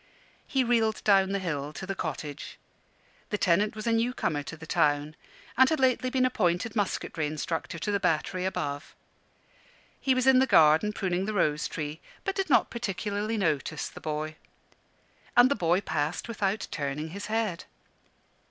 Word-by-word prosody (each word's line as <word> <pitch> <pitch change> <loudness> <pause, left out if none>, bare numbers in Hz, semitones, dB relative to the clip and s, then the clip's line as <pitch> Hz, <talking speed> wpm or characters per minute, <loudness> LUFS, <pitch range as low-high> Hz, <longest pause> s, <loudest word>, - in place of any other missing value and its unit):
He 270 -2 +1
reeled 230 -3 +1
down 195 -2 +4
the 200 - +1
hill 150 -6 -3
to 190 - -6
the 195 - -3
cottage. 150 -5 -5 0.7
The 210 - -1
tenant 200 +4 +2
was 215 - -6
a 230 - +2
newcomer 230 -10 0
to 165 +3 -8
the 160 - -10
town, 150 0 +1 0.4
and 260 +1 +6
had 315 - 0
lately 255 -1 +2
been 255 0 +2
appointed 205 -3 0
musketry 180 -6 -1
instructor 160 +2 -3
to 205 +6 -2
the 200 - +1
battery 180 +2 0
above. 145 -6 -3 1.0
He 265 -1 +2
was 255 0 +1
in 265 -1 +6
the 265 - +3
garden 160 +5 +5
pruning 190 -2 -1
the 215 0 -3
rose 150 -5 +1
tree, 150 0 -5 0.2
but 390 - -1
did 385 -3 -2
not 270 - +4
particularly 210 0 -2
notice 155 -4 -1
the - - -12
boy. 155 0 -4 1.0
And 245 +2 +7
the - - +3
boy 175 -1 +2
passed 160 -2 -2
without 210 -2 -1
turning 150 +1 -3
his 200 +5 -7
head. 215 -5 -1
190 Hz, 165 wpm, -28 LUFS, 155-225 Hz, 1.0 s, And